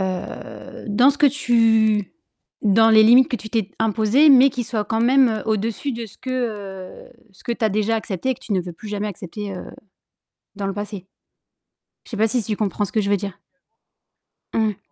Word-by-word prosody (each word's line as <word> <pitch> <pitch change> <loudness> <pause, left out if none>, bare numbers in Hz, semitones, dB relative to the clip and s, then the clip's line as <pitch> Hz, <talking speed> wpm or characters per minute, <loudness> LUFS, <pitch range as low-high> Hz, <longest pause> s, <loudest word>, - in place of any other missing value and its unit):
heu, 185 -1 -6
dans 245 +6 +4
ce 285 - -6
que 295 - +5
tu 225 -6 +2 0.5
dans 225 +2 +4
les 220 -1 +7
limites 245 +4 +6
que 245 - -2
tu 215 - -10
t'es 220 -4 -1
imposées, 225 +6 +3
mais 270 0 +7
qui 245 -1 -4
soit 220 -2 -3
quand 225 +1 -2
même 240 -3 +3
au-dessus 220 +5 -2
de 235 -1 -5
ce 210 - -18
que 210 -7 -5 0.2
ce 190 - -21
que 235 - -1
tu 235 - -3
as 215 - +2
déjà 215 +2 0
accepté 215 +1 -4
et - - 0
que - - -24
tu 215 - -6
veux 175 0 -8
plus 190 - -12
jamais 205 0 -3
accepter, 200 +1 -7
heu, 180 - -7 0.9
dans 200 -1 -3
le 195 - -3
passé? 205 -2 -7 1.0
Je - - -16
sais 225 - -5
pas 220 +2 +3
si 235 +1 -1
tu 210 +1 -3
comprends 205 -1 -1
ce 190 - -10
que 220 - 0
je 200 - -2
veux 205 - +3
dire. 200 -2 -7 1.2
Mmh. 215 -3 0
220 Hz, 200 wpm, -21 LUFS, 205-235 Hz, 1.2 s, les